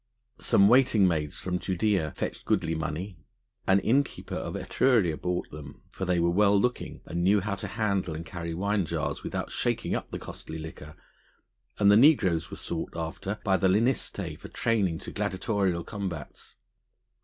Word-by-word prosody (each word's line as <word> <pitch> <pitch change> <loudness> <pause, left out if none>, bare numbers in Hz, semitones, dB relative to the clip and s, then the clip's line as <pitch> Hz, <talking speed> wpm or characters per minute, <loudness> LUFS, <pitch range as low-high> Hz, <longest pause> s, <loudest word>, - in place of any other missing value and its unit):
Some 100 - +5
waiting 115 -4 +5
maids 75 -4 -1
from 90 -1 -2
Judæa 95 -4 0
fetched - - -4
goodly 85 -3 +1
money; 80 +3 -4 0.5
an 95 +1 +5
innkeeper 135 +7 0
of - - -4
Etruria 110 -12 +2
bought 90 +2 -3
them, 70 -2 -10
for 95 - -4
they 90 -1 +1
were 85 0 +2
well 100 +2 +4
looking 125 +4 -2
and 85 0 -2
knew 100 +3 +4
how 100 +1 -2
to 100 - -4
handle 100 -6 -1
and 80 +1 -6
carry 85 -1 -5
wine 100 0 0
jars - - -2
without - - -4
shaking - - -1
up - - -3
the - - -4
costly 80 - -8
liquor; 80 -1 -9 0.8
and 100 0 +5
the 105 - +7
negroes 105 - +4
were - - -7
sought 80 -1 -4
after 85 +5 -4
by 95 -2 +3
the 95 - +2
lanistae 100 - 0
for - - -9
training 100 -8 0
to - - -8
gladiatorial 95 -2 -1
combats. 95 - -7
95 Hz, 165 wpm, -28 LUFS, 85-105 Hz, 0.8 s, the